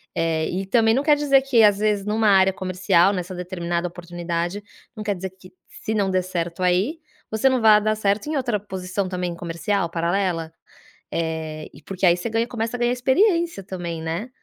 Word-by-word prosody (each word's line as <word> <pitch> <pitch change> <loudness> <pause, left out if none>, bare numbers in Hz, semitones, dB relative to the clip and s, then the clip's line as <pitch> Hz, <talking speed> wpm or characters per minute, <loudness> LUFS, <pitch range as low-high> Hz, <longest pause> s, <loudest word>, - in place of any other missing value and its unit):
eh, 160 -1 0
e 190 +2 -3
também 225 +2 +3
não 275 - +1
quer 295 -1 +4
dizer 275 -2 +4
que 265 -4 +3
às 205 -2 +5
vezes 210 -2 +1
numa 215 +1 +2
área 190 -1 +5
comercial, 185 0 +2
nessa 185 -1 -4
determinada 175 -1 -3
oportunidade 175 +2 -4 0.3
não 215 - -6
quer 205 -1 0
dizer 190 +1 -5
que 185 0 -17 0.2
se 220 - -5
não 200 -3 +1
der 185 -1 +1
certo, 180 0 -4
aí 190 - +1 0.3
você 220 +5 +2
não 260 -1 +1
vai 215 -2 +6
dar 215 +1 +1
certo 205 +3 0
em 310 - -1
outra 245 -5 0
posição 190 -1 -4
também 180 -2 -3
comercial 170 +2 -2
paralela, 170 -1 -1 0.6
eh, 160 -2 -3
e - - -15
porque 195 +2 -2
aí 175 -1 +6
você 180 +6 -4
ganha 225 +1 0
começa 230 0 -3
a - - -13
ganhar 240 0 +2
experiência 335 - +2
também, 175 -3 -5
né, 165 +9 -4
190 Hz, 195 wpm, -23 LUFS, 175-220 Hz, 0.6 s, vai